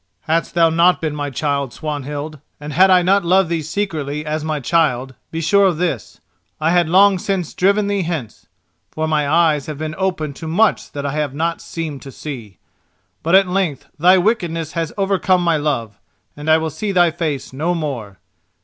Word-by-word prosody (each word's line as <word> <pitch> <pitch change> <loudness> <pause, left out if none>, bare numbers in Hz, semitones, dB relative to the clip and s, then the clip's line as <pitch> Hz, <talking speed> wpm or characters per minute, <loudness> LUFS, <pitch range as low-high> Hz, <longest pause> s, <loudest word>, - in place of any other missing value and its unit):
"Hadst 165 +1 -1
thou 165 -1 +4
not 170 +2 +4
been 155 -2 -3
my 145 -1 -3
child, 140 -1 -2
Swanhild, 150 0 -5 0.2
and 150 0 -7
had 190 +5 +5
I 180 -1 +5
not 195 +2 +3
loved 185 0 +3
thee 170 -1 -1
secretly 155 -4 -3
as 155 0 -2
my 155 -1 -2
child, 135 -3 +1 0.2
be 165 - -4
sure 200 +5 +4
of 175 -4 0
this, 165 - -3 0.4
I 160 +1 +1
had 175 -2 +3
long 195 +2 +5
since 185 -3 -2
driven 200 +3 +2
thee 200 -1 0
hence; 160 - -5 0.4
for 155 0 -3
my 150 -2 0
eyes 155 -3 +2
have 155 -2 -5
been 155 0 -4
open 180 -6 -1
to 160 - -8
much 205 +7 +1
that 145 0 -4
I 140 - -1
have 145 -2 -2
not 165 +2 -1
seemed 155 -5 -6
to 135 - -10
see. 120 -10 -8 0.6
But 165 +4 +2
at 195 0 +6
length 180 -7 -2
thy 180 +4 +6
wickedness 175 -6 0
has 165 -2 -3
overcome 195 -2 +2
my 170 -2 +2
love, 120 -9 -2 0.4
and 150 +2 -5
I 155 - +6
will 160 0 -2
see 200 +8 -3
thy 175 -3 +4
face 155 -6 -3
no 160 +6 -1
more. 125 - -5
160 Hz, 195 wpm, -19 LUFS, 145-180 Hz, 0.6 s, at